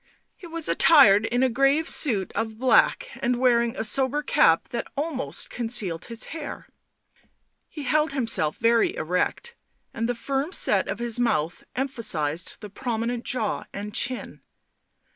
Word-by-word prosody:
He 355 - -12
was 330 -1 -4
attired 225 -10 +6
in 245 +2 0
a - - +4
grave 275 +6 +2
suit 210 - +2
of 220 -1 -3
black, 260 - +3
and 245 0 0
wearing 235 -2 +2
a - - -2
sober 265 +6 +1
cap 165 - +3
that 235 - -4
almost 290 -3 -4
concealed 220 -8 -3
his 230 0 -4
hair; 310 -3 -7 1.0
he 300 - -8
held 305 +3 +1
himself 225 - -1
very 230 0 +2
erect, 180 - -2 0.4
and 230 +1 -2
the 245 - -1
firm 275 +7 -3
set 195 - +2
of 195 - -3
his 235 0 -3
mouth 170 -9 -1
emphasised 175 - 0
the 210 - -8
prominent 235 +1 -3
jaw 225 -4 -2
and 205 +1 -7
chin. 255 0 -2
240 Hz, 145 wpm, -24 LUFS, 215-275 Hz, 1.0 s, attired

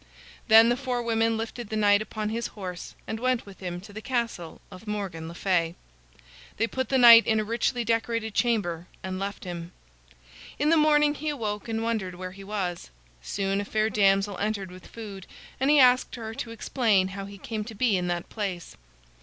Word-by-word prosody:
Then 225 +1 +8
the 240 - +2
four 250 -2 -2
women 225 -1 +1
lifted 225 0 -5
the 220 - -3
knight 205 -1 +4
upon 215 0 -4
his 230 +2 -2
horse 180 -3 -7
and 220 - -4
went 255 0 0
with 200 -1 -13
him 175 -2 -5
to 200 +2 -13
the 220 - -7
castle 230 -9 -3
of 185 +4 -12
Morgan 195 -6 -4
le 170 - -8
Fay. 175 -3 0 0.8
They 225 - +2
put 260 +3 -3
the 270 - +3
knight 235 -2 +9
in 220 -1 +3
a - - 0
richly 235 +3 0
decorated 230 -1 -1
chamber 190 -9 0 0.2
and 185 0 -4
left 200 +1 -4
him. 175 -1 -7 0.8
In 295 - +1
the 330 - +5
morning 300 -1 +4
he 305 +1 -4
awoke 215 -8 -3
and 225 0 -1
wondered 215 -6 -2
where 185 +1 -6
he 195 +1 -11
was. 195 - -4 0.3
Soon 195 - -1
a - - -3
fair 215 +1 0
damsel 195 -1 +2
entered 200 -3 -2
with 185 0 -12
food, 205 -5 -9 0.3
and 265 +2 +2
he 300 - +6
asked 255 -1 +5
her 225 -2 -6
to 230 - -5
explain 220 -4 +1
how 195 0 -6
he 200 0 -10
came 215 +2 -4
to 225 0 -9
be 230 -1 +2
in 180 -1 -1
that 175 -1 -2
place. 195 -5 -5
215 Hz, 200 wpm, -27 LUFS, 190-230 Hz, 0.8 s, knight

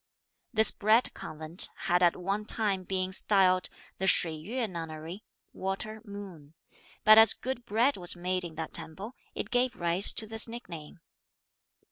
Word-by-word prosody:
This 220 -3 +1
Bread 220 +4 +2
Convent 155 +3 +2
had 175 +1 +1
at 175 -1 +3
one 195 +4 -4
time 205 -4 +2
been 185 0 -3
styled 185 -2 +3 0.3
the 190 - -1
Shui 165 -3 +3
Yueh 225 +10 -4
nunnery 165 +1 -8 0.3
(water 205 +3 -5
moon); 190 -8 -11 0.5
but 215 +1 +8
as 225 -1 +8
good 255 -2 -5
bread 235 +7 +1
was 175 -1 +1
made 180 +1 -2
in 165 -2 -8
that 160 -1 -6
temple, 170 +8 -4 0.2
it - - -5
gave 245 0 0
rise 170 +3 +3
to 220 - -1
this 220 +1 -2
nickname. 175 -9 -10
190 Hz, 150 wpm, -28 LUFS, 170-220 Hz, 0.5 s, but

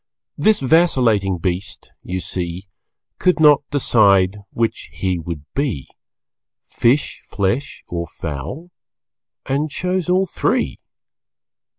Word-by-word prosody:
This 215 -5 +3
vacillating 125 - +3
beast, 90 +3 -4
you 95 +1 -4
see, 90 +3 -4 0.5
Could 180 -2 +2
not 150 -2 +6
decide 100 -8 +3
which 115 -1 -2
he 95 -2 -2
would 80 -3 -6
be 130 - -2 0.8
Fish, 130 +5 +1
flesh 105 +8 -2
or 85 -1 -4
fowl 85 - -6 0.7
and 145 +3 0
chose 180 +3 -2
all 185 +1 +3
three. - - -1
110 Hz, 100 wpm, -20 LUFS, 90-150 Hz, 0.8 s, not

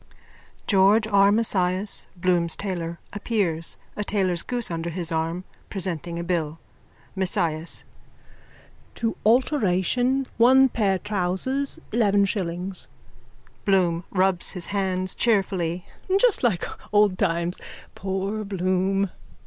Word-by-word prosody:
(George 200 +3 +4
R 200 -2 +4
Mesias, 200 -3 +2
Bloom's 175 -2 +1
tailor, 170 -4 -4 0.2
appears, 195 -6 -1 0.2
a 210 - -2
tailor's 185 -4 0
goose 240 -5 -2
under 165 0 -3
his 170 0 -3
arm, 165 +2 -2 0.3
presenting 170 -3 -2
a 170 - -3
bill.) 165 -3 -2 0.6
MESIAS: 170 -4 0 1.1
To 225 -1 -1
alteration 245 - +2
one 260 +3 +6
pair 200 -5 +1
trousers 210 +8 -2
eleven 205 -3 +3
shillings. 185 -1 -4 0.8
BLOOM: 180 -4 +2
(Rubs 185 -2 +1
his 180 -3 -4
hands 185 -2 0
cheerfully.) 185 -6 0 0.3
Just 480 -1 +3
like 215 -9 +1 0.3
old 205 -3 +3
times. 170 +1 0 0.3
Poor 195 +3 -3
Bloom! 190 0 0
190 Hz, 105 wpm, -24 LUFS, 175-210 Hz, 1.1 s, one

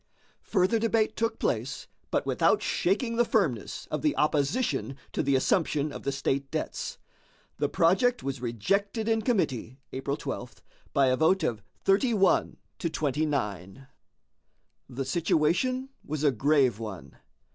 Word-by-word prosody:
Further 195 +3 +2
debate 220 -1 +1
took 225 0 -1
place, 120 +4 -2 0.2
but - - 0
without - - +2
shaking 230 +6 0
the 240 - +5
firmness - - 0
of - - -1
the 300 -2 +1
opposition 150 - 0 0.2
to - - 0
the 140 0 +2
assumption 150 +1 +1
of - - -7
the 140 - -1
state 135 0 -1
debts. - - -4 0.6
The - - +1
project 240 +9 +3
was 135 -2 -3
rejected 200 - -1
in 225 -1 +2
committee 140 - -1
(April 140 +2 -3
12) 120 -5 -6 0.3
by 140 -3 +3
a 130 - +2
vote 170 +4 +3
of 115 -8 -1 0.2
31 195 -1 +3 0.2
to 170 - -1
29. 135 - -2 1.0
The 130 +1 -4
situation 170 - +1
was 150 0 -4
a 145 - +5
grave 135 -2 +2
one. 105 -6 -8
150 Hz, 135 wpm, -28 LUFS, 135-210 Hz, 1.0 s, the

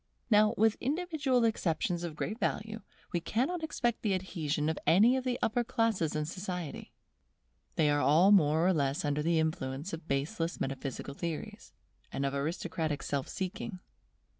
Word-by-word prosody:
Now, 215 0 +5
with 220 +1 +3
individual 290 -4 +1
exceptions 175 -5 0
of 165 -3 -4
great 215 +8 -3
value, 220 -2 -2 0.3
we 175 - +2
cannot 265 - -1
expect 240 -7 -1
the 205 -4 +1
adhesion 155 -5 -2
of 160 - -1
any 215 +9 +6
of 260 - -1
the 250 -1 -1
upper 240 +2 +2
classes 225 - 0
in 150 0 0
society. 180 -2 -5 0.8
They 155 - +3
are 145 0 +3
all 170 +8 +5
more 160 -4 +5
or 185 - +4
less 140 -2 0
under 145 0 0
the 165 +2 +2
influence 155 0 -2
of 165 0 -6
baseless 165 +5 -1
metaphysical 135 0 -4
theories, 165 +1 -5 0.4
and 140 - -2
of 135 - -1
aristocratic 155 +1 -2
self 140 -2 -2
seeking. 190 +2 -4
175 Hz, 160 wpm, -31 LUFS, 150-220 Hz, 0.8 s, any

